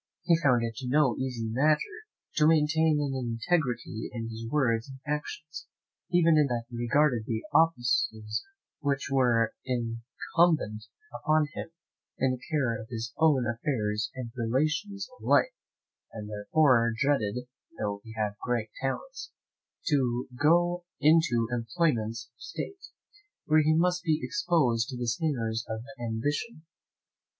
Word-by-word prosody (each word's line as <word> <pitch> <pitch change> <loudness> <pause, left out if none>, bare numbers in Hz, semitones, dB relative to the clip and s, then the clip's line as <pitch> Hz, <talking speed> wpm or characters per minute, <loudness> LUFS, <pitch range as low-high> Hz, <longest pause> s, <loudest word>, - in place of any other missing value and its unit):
He 170 - +4
found 125 -7 +3
it 115 -1 -3
no 130 -1 +3
easy 125 -4 -2
matter 155 - 0 0.3
to 150 - +5
maintain 160 0 +3
an 140 -2 -1
integrity 120 -1 -1
in 115 -2 -5
his 115 +1 -6
words 125 -4 +1
and 135 0 -10
actions, 150 +2 -5 0.4
even 170 -3 +4
in 150 - +4
things 120 -2 -2
that - - -7
regarded 120 0 +2
the 110 -1 -2
offices 120 -8 +2 0.4
which 140 -4 -1
were 120 -4 +3
incumbent 120 +1 0 0.3
upon 155 -1 +1
him, - - -6 0.5
in 130 0 +2
the 130 -1 -4
care 130 -8 0
of 110 - -10
his 115 -1 -5
own 150 -6 +4
affairs 110 -3 -1
and 125 -3 -6
relations 155 - -1
of - - -15
life, - - +3 0.6
and 105 -2 -7
therefore 115 +3 +3
dreaded 125 -3 0 0.3
(though 100 -1 -3
he 115 - -11
had 105 -2 -1
great 115 -3 -1
talents) - - -4 0.6
to 130 -6 +1
go 175 +5 +3 0.2
into 150 -7 +4
employments 115 -2 -1
of - - -29
state, 390 -1 -6 0.6
where 155 0 +5
he 155 +1 +3
must 180 +2 +2
be 155 -3 +1
exposed 145 -8 +1
to 130 - -5
the 120 -1 -3
snares 115 -3 -1
of 110 0 -3 0.2
ambition. 145 - -3
130 Hz, 135 wpm, -28 LUFS, 115-155 Hz, 0.6 s, to